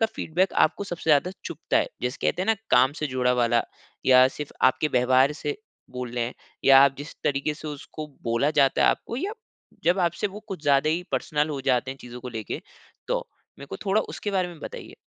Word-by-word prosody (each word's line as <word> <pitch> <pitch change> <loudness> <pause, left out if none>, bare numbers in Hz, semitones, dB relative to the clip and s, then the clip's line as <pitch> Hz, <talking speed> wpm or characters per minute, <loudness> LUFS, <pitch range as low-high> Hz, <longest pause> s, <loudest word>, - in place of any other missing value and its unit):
का 225 - +4
फ़ीडबैक 180 +4 0
आपको 200 - +2
सबसे 170 -3 -2
ज़्यादा 150 +5 +4
चुभता - - -2
है? - - +1 0.2
जैसे 125 +2 -2
कहते 180 +4 0
है - - -3
ना 225 - +4 0.2
काम 130 +3 +5
से - - +2
जुड़ा 125 -1 +1
वाला 120 -1 +2 0.4
या 130 0 +7
सिर्फ 150 +2 -7
आपके 130 +4 +3
व्यवहार 130 +2 +3
से 145 -1 -2 0.3
बोल 125 -1 -5
रहे 120 -1 0
हैं, 120 - -5 0.3
या 135 0 +8
आप 140 - +2
जिस 145 +3 -8
तरीके 140 +2 0
से 155 +1 -8
उसको 150 +1 -7 0.2
बोला 115 +5 +1
जाता 140 -3 +3
है - - +5
आपको, 235 - -4
या 390 +10 -2 0.5
जब 175 +3 +3
आपसे 170 +5 -3
वो 205 +2 -8
कुछ 185 -6 -6
ज़्यादा 145 +1 +3
ही 170 +3 0
पर्सनल 150 -1 0
हो 140 -2 -3
जाते 125 +1 +1
हैं 135 - -8
चीज़ों 125 0 -9
को 125 - -7
लेके 110 -4 -5 0.5
तो? - - -1 0.3
मेरे 140 - -9
को - - -6
थोड़ा 200 +3 +3
उसके 205 - -4
बारे 185 -2 0
में 170 -3 -11
बताइए? - - -8
145 Hz, 220 wpm, -25 LUFS, 130-170 Hz, 0.5 s, या